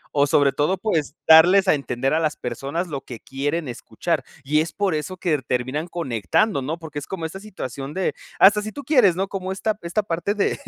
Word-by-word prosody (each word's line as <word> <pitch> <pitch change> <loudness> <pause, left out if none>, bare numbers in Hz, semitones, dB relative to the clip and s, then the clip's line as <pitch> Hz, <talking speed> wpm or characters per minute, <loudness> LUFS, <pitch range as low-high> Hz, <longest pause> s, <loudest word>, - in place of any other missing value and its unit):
o 145 0 +4
sobre 140 -1 +4
todo, 150 +8 0
pues, 165 -7 -1
darles 180 +5 +7
a - - +6
entender 135 -1 -1
a 160 - +3
las 155 -2 -1
personas 140 +9 -4
lo 140 -4 -5
que 120 -4 -9
quieren 145 +6 -3
escuchar. 120 - -3 0.2
Y 150 +3 +2
es 165 - -3
por 200 -4 0
eso 155 +5 -4
que 175 -3 0
r 145 - 0
terminan 130 +6 -2
conectando, 140 - 0
¿no?, 155 +6 -3
porque 155 -3 -7
es 140 - -10
como 175 -4 -5
esa 175 +4 -6
situación 145 - -7
de 190 - 0 0.2
hasta 210 +2 +6
si 215 +1 -5
tú 285 - -8
quieres, 245 - +4
¿no?, 190 +2 -1
como 190 -1 -4
esta 215 +3 -1
esta 170 +5 -1
parte 200 +3 -2
de 205 - 0
160 Hz, 220 wpm, -22 LUFS, 140-190 Hz, 0.2 s, darles